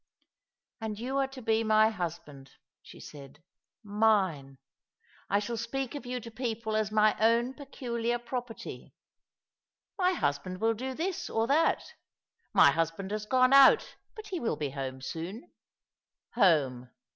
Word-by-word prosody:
*' -, -, -54 dB
And 220 Hz, -2 st, -4 dB
you 255 Hz, +5 st, -3 dB
are 270 Hz, -1 st, +2 dB
to 265 Hz, -2 st, -11 dB
be 220 Hz, 0 st, +2 dB
my 215 Hz, 0 st, +4 dB
husband," 160 Hz, -8 st, -7 dB, 0.3 s
she -, -, -14 dB
said. 145 Hz, +1 st, -12 dB, 0.2 s
" -, -, -64 dB
Mine! 200 Hz, -10 st, +1 dB, 0.7 s
I 200 Hz, -, +3 dB
shall 230 Hz, +3 st, -3 dB
speak 245 Hz, +3 st, -3 dB
of 285 Hz, -4 st, -7 dB
you 250 Hz, 0 st, -3 dB
to 230 Hz, -, -10 dB
people 225 Hz, -2 st, -3 dB
as 215 Hz, -1 st, 0 dB
my 215 Hz, 0 st, +4 dB
own 230 Hz, +3 st, +3 dB
peculiar 240 Hz, -4 st, -3 dB
property. 240 Hz, -1 st, -7 dB, 0.5 s
* -, -, -64 dB
My 365 Hz, 0 st, +3 dB
husband 180 Hz, -, -2 dB
will 225 Hz, +2 st, +2 dB
do 260 Hz, +4 st, -5 dB
this 350 Hz, +4 st, -3 dB
or 225 Hz, 0 st, 0 dB
that.' 290 Hz, +7 st, +1 dB, 0.3 s
' 465 Hz, -, -48 dB
My -, -, +7 dB
husband 165 Hz, +4 st, -2 dB
has 210 Hz, 0 st, -4 dB
gone 255 Hz, +1 st, +4 dB
out, 275 Hz, -1 st, +6 dB, 0.2 s
but 435 Hz, -2 st, -9 dB
he 365 Hz, -3 st, -3 dB
will 230 Hz, -, -1 dB
be 145 Hz, -3 st, -3 dB
home 130 Hz, -1 st, -5 dB
soon.' 185 Hz, -, -6 dB, 0.8 s
Home. 145 Hz, -, +2 dB
220 Hz, 155 wpm, -29 LUFS, 175-250 Hz, 0.8 s, My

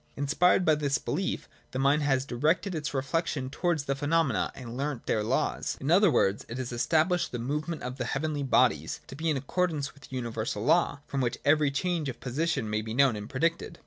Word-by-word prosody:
Inspired 165 Hz, +6 st, +3 dB
by 155 Hz, -, +5 dB
this 145 Hz, -2 st, +1 dB
belief, 185 Hz, +6 st, -3 dB, 0.2 s
the -, -, -5 dB
mind 140 Hz, +3 st, +3 dB
has 135 Hz, -2 st, +1 dB
directed 155 Hz, +10 st, 0 dB
its 150 Hz, -2 st, -3 dB
reflection 140 Hz, -1 st, -1 dB
towards 165 Hz, -1 st, 0 dB
the 140 Hz, -, 0 dB
phenomena, 145 Hz, -2 st, +1 dB
and 120 Hz, -2 st, -8 dB
learnt 135 Hz, -2 st, -3 dB
their 110 Hz, -, +1 dB
laws. 120 Hz, +5 st, -1 dB
In 140 Hz, +4 st, -1 dB
other 195 Hz, +3 st, +6 dB
words, 100 Hz, -8 st, +2 dB
it 115 Hz, -, -5 dB
has 130 Hz, -2 st, -4 dB
established 155 Hz, +9 st, +1 dB
the 120 Hz, -, -3 dB
movement 150 Hz, +7 st, -3 dB
of 125 Hz, +2 st, -5 dB
the 130 Hz, -, -1 dB
heavenly 150 Hz, +3 st, -2 dB
bodies 135 Hz, -, +2 dB
to -, -, -10 dB
be 160 Hz, +3 st, -1 dB
in 150 Hz, -, +1 dB
accordance 150 Hz, +1 st, -1 dB
with 140 Hz, -1 st, -16 dB
a -, -, -5 dB
universal 115 Hz, -3 st, -3 dB
law 170 Hz, -4 st, +3 dB
from 140 Hz, -, -2 dB
which 120 Hz, -2 st, -1 dB
every 150 Hz, 0 st, +4 dB
change 160 Hz, +1 st, -1 dB
of 125 Hz, -, -7 dB
position 140 Hz, -1 st, -1 dB
may 105 Hz, 0 st, -1 dB
be 110 Hz, +1 st, -5 dB
known 135 Hz, -3 st, +4 dB
and 105 Hz, 0 st, -7 dB
predicted. 165 Hz, +4 st, -1 dB
140 Hz, 210 wpm, -28 LUFS, 125-160 Hz, 0.2 s, other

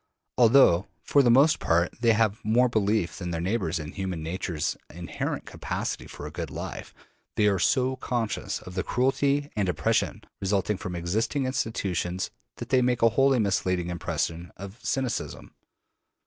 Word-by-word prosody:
Although, 115 Hz, -7 st, +6 dB, 0.2 s
for 145 Hz, -, +4 dB
the 125 Hz, -, +3 dB
most 140 Hz, +6 st, +5 dB
part, 85 Hz, +1 st, +1 dB
they 115 Hz, -2 st, +5 dB
have 110 Hz, 0 st, +1 dB
more 120 Hz, +4 st, +4 dB
belief 105 Hz, -5 st, 0 dB
than 90 Hz, -2 st, -4 dB
their 85 Hz, -1 st, -2 dB
neighbors 90 Hz, -2 st, -1 dB
in 75 Hz, 0 st, -6 dB
human 95 Hz, -5 st, -4 dB
nature's 85 Hz, -1 st, -2 dB
inherent 85 Hz, +1 st, -4 dB
capacity -, -, -4 dB
for -, -, -9 dB
a -, -, -6 dB
good -, -, -5 dB
life, -, -, -6 dB, 0.4 s
they 105 Hz, -, +3 dB
are 100 Hz, -2 st, +3 dB
so 130 Hz, +6 st, +2 dB
conscious 120 Hz, -4 st, -2 dB
of 90 Hz, -, -10 dB
the 95 Hz, -, -1 dB
cruelty 140 Hz, +4 st, +1 dB
and 100 Hz, -3 st, 0 dB
oppression 90 Hz, -, 0 dB, 0.2 s
resulting 100 Hz, +1 st, 0 dB
from 90 Hz, -1 st, -5 dB
existing 110 Hz, -, -1 dB
institutions 95 Hz, -8 st, -2 dB, 0.2 s
that -, -, -8 dB
they 130 Hz, -1 st, +4 dB
make 125 Hz, -1 st, +1 dB
a 115 Hz, -, +7 dB
wholly 135 Hz, +3 st, +3 dB
misleading 90 Hz, -4 st, 0 dB
impression 85 Hz, 0 st, -3 dB
of 100 Hz, +4 st, -10 dB
cynicism. 130 Hz, -3 st, -3 dB
105 Hz, 160 wpm, -27 LUFS, 90-125 Hz, 0.4 s, a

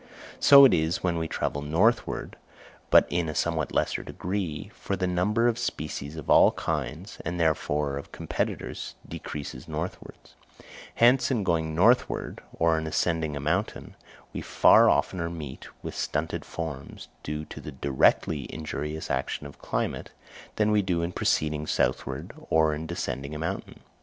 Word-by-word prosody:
So 140 Hz, -1 st, +9 dB
it 130 Hz, -, +6 dB
is 80 Hz, 0 st, 0 dB
when 85 Hz, -2 st, +1 dB
we 80 Hz, -, -2 dB
travel 70 Hz, -, -2 dB
northward, 90 Hz, +11 st, +1 dB, 0.5 s
but -, -, +7 dB
in 85 Hz, -2 st, 0 dB
a 75 Hz, -, -5 dB
somewhat 80 Hz, -2 st, 0 dB
lesser -, -, 0 dB
degree, 90 Hz, -5 st, -4 dB
for 100 Hz, -, -3 dB
the 95 Hz, -, -1 dB
number 95 Hz, +6 st, +2 dB
of 120 Hz, -1 st, 0 dB
species 75 Hz, 0 st, -4 dB
of 80 Hz, -4 st, -8 dB
all -, -, +6 dB
kinds, 80 Hz, -, -4 dB
and 85 Hz, +1 st, -3 dB
therefore 75 Hz, -3 st, 0 dB
of 70 Hz, -, -8 dB
competitors, -, -, -4 dB
decreases 70 Hz, -4 st, -7 dB
northward; 80 Hz, +3 st, -5 dB, 0.8 s
hence 125 Hz, +3 st, +5 dB
in 120 Hz, -6 st, 0 dB
going 80 Hz, -3 st, 0 dB
northward, 115 Hz, +9 st, +2 dB
or 80 Hz, -1 st, +2 dB
in 80 Hz, -, -4 dB
ascending 80 Hz, -1 st, 0 dB
a -, -, -3 dB
mountain, 90 Hz, +9 st, -2 dB, 0.4 s
we -, -, -4 dB
far -, -, +6 dB
oftener 85 Hz, -3 st, +1 dB
meet 75 Hz, -6 st, -7 dB, 0.2 s
with -, -, -5 dB
stunted 75 Hz, +2 st, -2 dB
forms, 75 Hz, -5 st, -6 dB
due 75 Hz, +1 st, -4 dB
to -, -, -9 dB
the 75 Hz, -, -7 dB
directly 70 Hz, +1 st, +1 dB
injurious 75 Hz, 0 st, -4 dB
action 65 Hz, +2 st, -2 dB
of 70 Hz, -, -11 dB
climate, -, -, -3 dB, 0.5 s
than 105 Hz, 0 st, +2 dB
we 105 Hz, -1 st, +4 dB
do 90 Hz, -3 st, -1 dB
in 85 Hz, -, -2 dB
proceeding 75 Hz, -3 st, 0 dB
southward -, -, -1 dB, 0.2 s
or 80 Hz, -1 st, +3 dB
in 80 Hz, +2 st, -5 dB
descending 70 Hz, -3 st, -4 dB
a -, -, -3 dB
mountain. 80 Hz, +2 st, -5 dB
80 Hz, 155 wpm, -27 LUFS, 75-90 Hz, 0.8 s, So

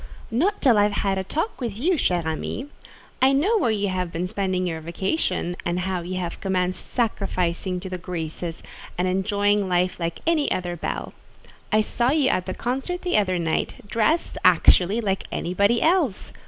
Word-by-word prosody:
"Not 350 Hz, -, +1 dB
till 240 Hz, -7 st, +5 dB
I -, -, +6 dB
have 210 Hz, -, +1 dB
had 195 Hz, -1 st, +1 dB
a -, -, -2 dB
talk 315 Hz, -, -3 dB
with 225 Hz, -5 st, -3 dB
you, 330 Hz, +11 st, +2 dB
chère 180 Hz, -, +1 dB
amie. 160 Hz, -, -3 dB, 0.6 s
I 265 Hz, +1 st, +5 dB
know 390 Hz, +12 st, +3 dB
where 245 Hz, -, +2 dB
you 205 Hz, -2 st, 0 dB
have 180 Hz, -2 st, -2 dB
been 170 Hz, +2 st, -2 dB
spending 185 Hz, -1 st, -1 dB
your 165 Hz, -2 st, -3 dB
vacation, 175 Hz, -, -1 dB
and 175 Hz, +1 st, -1 dB
how 185 Hz, -1 st, -2 dB
you 180 Hz, +2 st, -4 dB
have 175 Hz, -2 st, -4 dB
commenced 185 Hz, -1 st, -1 dB
sacrificing 185 Hz, -6 st, -1 dB
to 190 Hz, -, -6 dB
the 185 Hz, -1 st, -5 dB
graces, 165 Hz, -1 st, -5 dB, 0.3 s
and 180 Hz, +1 st, +1 dB
enjoying 200 Hz, +1 st, +1 dB
life 180 Hz, +1 st, +1 dB
like 170 Hz, -1 st, -3 dB
any 320 Hz, -3 st, +2 dB
other 175 Hz, -1 st, -1 dB
belle. 170 Hz, -, -4 dB, 0.6 s
I 215 Hz, -, +4 dB
saw 240 Hz, +3 st, 0 dB
you 285 Hz, -2 st, +3 dB
at 185 Hz, -, 0 dB
the 185 Hz, -, -3 dB
concert 270 Hz, +9 st, -3 dB
the 360 Hz, -, 0 dB
other 185 Hz, -3 st, +2 dB
night, 165 Hz, -2 st, -1 dB
dressed, 230 Hz, +11 st, +1 dB
actually, 195 Hz, +6 st, +5 dB
like 195 Hz, -3 st, -1 dB
anybody 200 Hz, +6 st, +1 dB
else. 320 Hz, -, +1 dB
195 Hz, 180 wpm, -24 LUFS, 180-240 Hz, 0.6 s, I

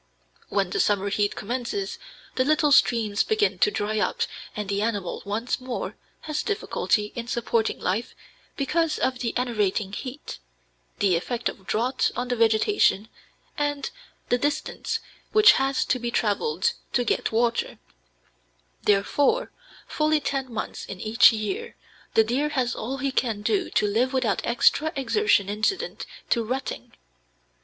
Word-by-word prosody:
When 195 Hz, -3 st, 0 dB
the -, -, -1 dB
summer 200 Hz, -1 st, +2 dB
heat 205 Hz, +1 st, 0 dB
commences 250 Hz, -, -3 dB, 0.3 s
the 255 Hz, -, +2 dB
little 305 Hz, +1 st, +3 dB
streams 225 Hz, -6 st, +4 dB
begin 435 Hz, -1 st, +1 dB
to -, -, +5 dB
dry 215 Hz, -, -1 dB
up, -, -, -1 dB, 0.3 s
and 210 Hz, -1 st, -3 dB
the 200 Hz, 0 st, -1 dB
animal 205 Hz, -5 st, -2 dB
once 220 Hz, +5 st, -2 dB
more 255 Hz, -1 st, -4 dB, 0.3 s
has 305 Hz, -1 st, -2 dB
difficulty 225 Hz, -, -1 dB
in 235 Hz, 0 st, -5 dB
supporting 230 Hz, -2 st, 0 dB
life 200 Hz, +6 st, -2 dB, 0.4 s
because 310 Hz, +2 st, +1 dB
of 255 Hz, -1 st, 0 dB
the 240 Hz, -1 st, -2 dB
enervating 210 Hz, -5 st, 0 dB
heat, 255 Hz, -, -7 dB, 0.6 s
the 190 Hz, -3 st, +3 dB
effect 235 Hz, +8 st, -1 dB
of 190 Hz, -, -11 dB
drought 240 Hz, +5 st, +1 dB
on 245 Hz, +1 st, -3 dB
the 245 Hz, -, +1 dB
vegetation, 225 Hz, -, +3 dB, 0.5 s
and 290 Hz, -1 st, -1 dB, 0.4 s
the 245 Hz, -, +2 dB
distance 290 Hz, +2 st, -2 dB, 0.3 s
which 430 Hz, 0 st, +8 dB
has 270 Hz, 0 st, +1 dB
to 255 Hz, -, 0 dB
be 240 Hz, 0 st, -2 dB
traveled 345 Hz, -, 0 dB, 0.2 s
to 245 Hz, -, +2 dB
get 235 Hz, -, 0 dB
water; 230 Hz, +1 st, 0 dB, 1.0 s
therefore, 285 Hz, -, +2 dB, 0.4 s
fully 305 Hz, 0 st, +2 dB
ten 270 Hz, -3 st, -3 dB
months 220 Hz, -, -5 dB
in 195 Hz, -2 st, -8 dB
each 220 Hz, +5 st, +6 dB
year 375 Hz, -, -4 dB, 0.4 s
the 225 Hz, -, +7 dB
deer 260 Hz, +7 st, 0 dB
has 255 Hz, -5 st, 0 dB
all 260 Hz, +5 st, -4 dB
he 275 Hz, +1 st, -1 dB
can 225 Hz, -5 st, -1 dB
do 385 Hz, -, +1 dB
to -, -, +2 dB
live 235 Hz, +6 st, +1 dB
without 255 Hz, -6 st, +1 dB
extra 285 Hz, +6 st, +3 dB
exertion 275 Hz, -, +2 dB
incident 215 Hz, -, -2 dB, 0.2 s
to 235 Hz, -, +3 dB
rutting. 255 Hz, +4 st, -4 dB
240 Hz, 145 wpm, -25 LUFS, 215-285 Hz, 1.0 s, which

